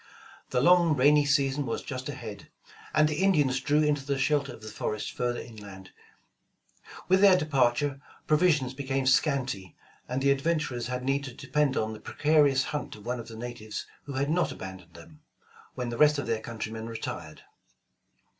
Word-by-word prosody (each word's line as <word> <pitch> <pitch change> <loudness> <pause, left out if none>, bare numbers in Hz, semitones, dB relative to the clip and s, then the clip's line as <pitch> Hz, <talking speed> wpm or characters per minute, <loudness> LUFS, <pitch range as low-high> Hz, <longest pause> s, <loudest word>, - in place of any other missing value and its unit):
The 125 - +1
long 175 0 +5
rainy 145 +2 +5
season 140 -1 +1
was 115 - -3
just 130 0 -5
ahead, 115 -7 -8 0.4
and 155 0 +4
the 150 +3 -2
Indians 145 -9 +3
drew 145 +4 +2
into 145 -2 +1
the 140 0 -1
shelter 140 0 +1
of 110 - -12
the - - -8
forest 105 -1 -3
further 120 -1 -2
inland. 100 -5 -11 1.2
With 190 +1 +4
their 195 -2 +7
departure 140 -2 +1 0.2
provisions 150 -5 +2
became 135 0 -2
scanty, 130 - +1 0.3
and 125 +1 -1
the 140 +1 +3
ad 140 0 +1
venturers 150 -7 -1
had 125 0 -3
need 135 +2 0
to 125 -3 -8
depend 140 0 0
on 110 0 -1
the 110 - -9
precarious 145 -3 +3
hunt 150 +1 -4
of 105 0 -14
one 125 +1 -2
of 115 - -8
the 115 -1 -9
natives 115 -2 -6 0.2
who 140 - -6
had 140 +3 0
not 175 +1 +1
abandoned 95 -3 -9
them, 80 -2 -14 0.5
when 125 -2 -3
the 120 - -5
rest 150 0 +5
of 145 - -2
their 115 -1 -1
countrjoneu 110 -1 -6
retired. 95 -8 -6
135 Hz, 175 wpm, -28 LUFS, 115-150 Hz, 1.2 s, their